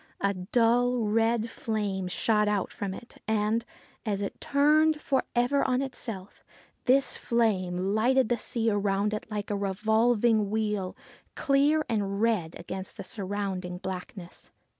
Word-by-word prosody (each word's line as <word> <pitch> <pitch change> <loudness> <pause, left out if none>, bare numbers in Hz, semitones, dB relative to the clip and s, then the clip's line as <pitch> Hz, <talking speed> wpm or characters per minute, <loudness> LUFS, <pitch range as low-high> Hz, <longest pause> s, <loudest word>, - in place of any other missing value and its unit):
A 200 0 +2
dull, 235 +5 +2
red 225 +1 +2
flame 205 -5 -2
shot 210 +3 +2
out 205 -2 0
from 195 -2 -4
it, 235 - -13
and, 220 +1 +1 0.4
as 205 -3 -1
it 200 - -6
turned 300 +2 +3
for 270 -3 +1
ever 245 +4 +2
on 255 0 +1
itself, 220 -7 -7 0.4
this 270 +2 +3
flame 195 -5 0
lighted 250 +3 +3
the 240 -1 0
sea 225 0 -1
around 205 0 +1 0.2
like 210 -1 -4
a - - 0
revolving 220 +2 +2
wheel, 210 -3 -1 0.4
clear 290 +2 +3
and 200 -3 -1
red 210 -8 +1
against 190 +2 -6
the - - -6
surrounding 190 -3 -4
blackness. 180 -1 -7
215 Hz, 135 wpm, -28 LUFS, 195-240 Hz, 0.4 s, turned